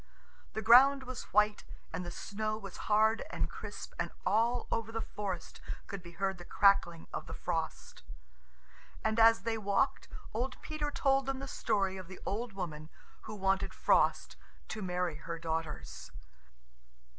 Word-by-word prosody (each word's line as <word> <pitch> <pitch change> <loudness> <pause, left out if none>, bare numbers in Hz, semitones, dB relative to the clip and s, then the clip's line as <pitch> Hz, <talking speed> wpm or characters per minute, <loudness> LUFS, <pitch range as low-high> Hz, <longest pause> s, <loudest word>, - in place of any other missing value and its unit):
The 220 - -3
ground 265 +5 +8
was 255 -1 -6
white 210 +1 +3 0.3
and 170 +2 -2
the 175 - -5
snow 215 +4 -3
was 195 -3 -8
hard 220 +1 +4
and - - -1
crisp, - - -7
and - - 0 0.2
all 235 +3 +2
over 225 -1 -1
the 225 - -2
forest 200 -5 -5 0.2
could 200 -2 -6
be 170 0 -11
heard 190 0 -1
the - - -8
crackling 175 -3 +3
of - - -4
the - - -6
frost. 165 -2 -3 1.0
And 220 +1 +2
as 225 0 +7
they 225 -1 -1
walked, 205 +6 +1 0.3
old 250 +4 -2
Peter 305 -1 -2
told 270 -2 +2
them 270 -1 -1
the 275 +1 -6
story 195 -7 0
of 185 -2 -8
the 185 - -10
old 225 +2 -2
woman 155 -5 -5 0.4
who 215 - -6
wanted 195 -1 0
Frost - - +2 0.3
to 215 - -4
marry 180 -4 -1
her 170 +1 -5
daughters. 160 - -4
205 Hz, 155 wpm, -33 LUFS, 180-230 Hz, 1.0 s, ground